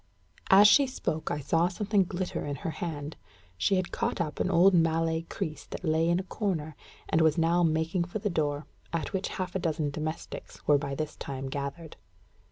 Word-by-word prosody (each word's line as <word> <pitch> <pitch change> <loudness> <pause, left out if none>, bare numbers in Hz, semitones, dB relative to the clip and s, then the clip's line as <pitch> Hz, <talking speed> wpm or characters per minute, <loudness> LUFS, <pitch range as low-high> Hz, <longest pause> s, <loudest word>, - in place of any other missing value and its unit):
As 200 +2 +9
she 275 +6 +6
spoke, 160 -10 -3
I 150 - -1
saw 165 +4 +2
something 200 +1 +1
glitter 180 +1 -3
in 145 -1 -3
her 165 - 0
hand. 155 -2 -5 0.4
She 195 - +2
had 185 -1 -1
caught 235 -2 -1
up 155 -4 -2
an - - +1
old 185 +2 +5
Malay 165 -1 +2
creese 155 -7 -5
that - - -7
lay 160 +1 +2
in 170 +1 +3
a - - -3
corner, 175 -7 -3 0.3
and 160 - +2
was 160 0 +4
now 170 +1 +3
making 165 +2 +1
for 175 +4 -4
the 210 - -2
door, 150 -5 -1 0.3
at 165 -3 -3
which 190 0 -1
half 185 -1 -3
a 190 - -1
dozen 155 -3 -1
domestics 155 +2 -6
were 145 -1 +5
by 140 -1 -4
this 155 +1 -4
time 135 -1 -5
gathered. 140 +4 -5
165 Hz, 195 wpm, -29 LUFS, 155-185 Hz, 0.4 s, As